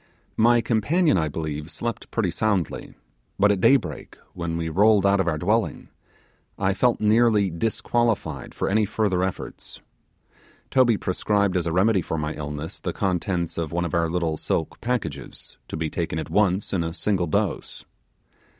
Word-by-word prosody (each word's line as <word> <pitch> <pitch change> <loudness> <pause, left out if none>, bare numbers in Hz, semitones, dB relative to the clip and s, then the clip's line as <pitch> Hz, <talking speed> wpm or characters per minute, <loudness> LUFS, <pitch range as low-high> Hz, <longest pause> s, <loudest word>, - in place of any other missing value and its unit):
My 120 +1 +5
companion, 145 - +2
I 80 - 0
believe, 75 0 -4
slept 115 +7 -5
pretty 100 -7 0
soundly; 100 -4 -1 0.4
but 105 +1 +4
at 100 -2 0
day 135 - +7
break, 85 - -4 0.2
when 85 -1 -3
we 85 -1 -2
rolled 100 +4 +4
out 100 0 +4
of 95 - +1
our 80 -3 +1
dwelling, 105 +8 0 0.7
I 95 0 +1
felt 120 +5 +2
nearly 105 -2 +3
disqualified 105 - -1
for - - -1
any 105 +3 +2
further 100 -3 0
efforts. 95 0 -5 0.9
Toby 120 -4 +4
prescribed 100 +1 0
as 85 -2 0
a - - 0
remedy 95 +3 +3
for 80 - -3
my 75 0 -2
illness 75 +4 -6
the - - -3
contents 90 -3 -1
of 80 -3 -3
one 85 +1 -1
of 85 - -5
our 85 -1 +1
little 85 -2 -1
silk 80 - -2
packages, 105 - -4
to - - -5
be 80 0 -1
taken 80 0 -3
at 80 - -5
once 100 -1 +1
in 90 -3 +1
a 80 +1 -4
single 95 -3 0
dose. - - -2
95 Hz, 170 wpm, -24 LUFS, 80-110 Hz, 0.9 s, day